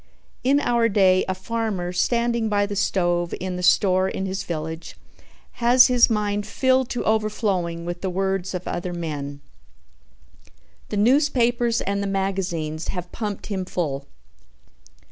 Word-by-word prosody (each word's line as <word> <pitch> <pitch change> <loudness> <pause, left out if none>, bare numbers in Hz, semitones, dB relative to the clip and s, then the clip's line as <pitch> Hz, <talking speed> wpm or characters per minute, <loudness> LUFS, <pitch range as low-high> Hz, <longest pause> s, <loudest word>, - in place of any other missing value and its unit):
In 275 +3 +4
our 235 -4 +2
day 190 -2 +4
a 185 - 0
farmer 190 -3 -3
standing 235 +3 +1
by 205 -1 +2
the 205 0 -5
stove 175 -3 0
in 185 0 -3
the 180 - -4
store 185 +1 +3
in 190 - -3
his 190 0 -3
village 160 0 -5 0.6
has 245 +2 +6
his 245 -1 +5
mind 205 -2 -1
filled 260 -1 +2
to 245 - -2
overflowing 200 -6 0
with 175 0 -5
the 190 - -1
words 190 0 -1
of 180 - -5
other 175 +1 -3
men. 145 -4 -5 1.5
The - - -2
newspapers 240 -1 +2
and 200 0 -1
the 200 - -2
magazines 185 -5 -2
have 180 -1 -5
pumped 210 -3 -4
him 195 -3 -3
full. 145 -7 -3
195 Hz, 145 wpm, -23 LUFS, 175-225 Hz, 1.5 s, has